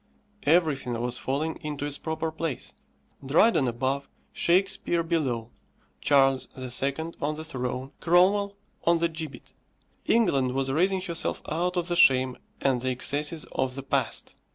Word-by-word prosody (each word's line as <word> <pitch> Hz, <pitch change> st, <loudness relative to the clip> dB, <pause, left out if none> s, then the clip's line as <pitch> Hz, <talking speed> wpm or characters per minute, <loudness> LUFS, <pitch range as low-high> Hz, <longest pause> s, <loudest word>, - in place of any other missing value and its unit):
_" -, -, -16 dB
Everything 140 Hz, -8 st, +2 dB
was 120 Hz, +1 st, -2 dB
falling 150 Hz, +5 st, -2 dB
into 150 Hz, -2 st, -5 dB
its 145 Hz, -1 st, -3 dB
proper 160 Hz, 0 st, -3 dB
place: 145 Hz, -, -4 dB, 0.5 s
Dryden 150 Hz, -, +4 dB
above, 130 Hz, +4 st, -2 dB, 0.2 s
Shakespeare 175 Hz, -1 st, +2 dB
below; 130 Hz, -9 st, -1 dB, 0.5 s
Charles 135 Hz, -2 st, +3 dB
II. 135 Hz, +5 st, -2 dB
on 150 Hz, +2 st, -1 dB
the 155 Hz, -, -6 dB
throne, 130 Hz, -3 st, -4 dB
Cromwell 195 Hz, +4 st, +3 dB, 0.3 s
on 170 Hz, 0 st, +4 dB
the 170 Hz, +1 st, +2 dB
gibbet. 160 Hz, -6 st, -7 dB, 0.5 s
England 135 Hz, -, +3 dB
was 135 Hz, 0 st, 0 dB
raising 185 Hz, +6 st, +2 dB
herself 170 Hz, -3 st, -1 dB
out 180 Hz, +3 st, -1 dB
of 175 Hz, -1 st, 0 dB
the 175 Hz, -, 0 dB
shame 130 Hz, -5 st, +5 dB, 0.2 s
and 130 Hz, -3 st, +1 dB
the 130 Hz, -, -1 dB
excesses 145 Hz, +5 st, -1 dB
of 130 Hz, -1 st, -1 dB
the 135 Hz, -, -5 dB
past. -, -, -1 dB
145 Hz, 145 wpm, -27 LUFS, 130-165 Hz, 0.5 s, shame